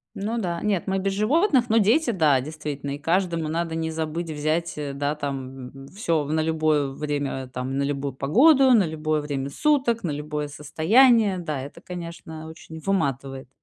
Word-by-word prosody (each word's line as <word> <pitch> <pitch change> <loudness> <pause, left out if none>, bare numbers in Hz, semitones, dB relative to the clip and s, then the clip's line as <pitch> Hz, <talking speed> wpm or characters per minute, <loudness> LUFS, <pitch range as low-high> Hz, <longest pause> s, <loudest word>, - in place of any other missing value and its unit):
Ну 220 +4 -2
да, 175 -5 -2
нет, 205 -4 0
мы 190 0 0
без 195 +1 -1
животных, 260 - +2
но 225 - +2
дети, 235 +7 +3
да, 155 - +3
действительно, 145 -1 -5
и - - -6
каждому 170 0 0
надо 165 0 -2
не 160 0 -2
забыть 160 +1 -3
взять, 155 +3 -1
э, 145 -2 -3
да, 145 +2 -1
там, 135 -3 -5 0.2
м, - - -13
всё 165 -6 -1
на 155 +2 0
любое 155 -2 +1
время, 140 -2 -3
там, 130 +1 -4
на 140 - +1
любую 140 -1 -2
погоду, 260 - +5
на 205 -7 +5
любое 155 -1 -1
время 140 -2 -3
суток, 260 - +1
на 170 - -2
любое 150 0 -4
состояние. 200 - +3
Да, 155 -6 -3
это, 140 +2 -9
конечно, 170 -2 -8
очень 160 0 -10
выматывает. 135 -8 -2
160 Hz, 175 wpm, -24 LUFS, 145-195 Hz, 0.2 s, погоду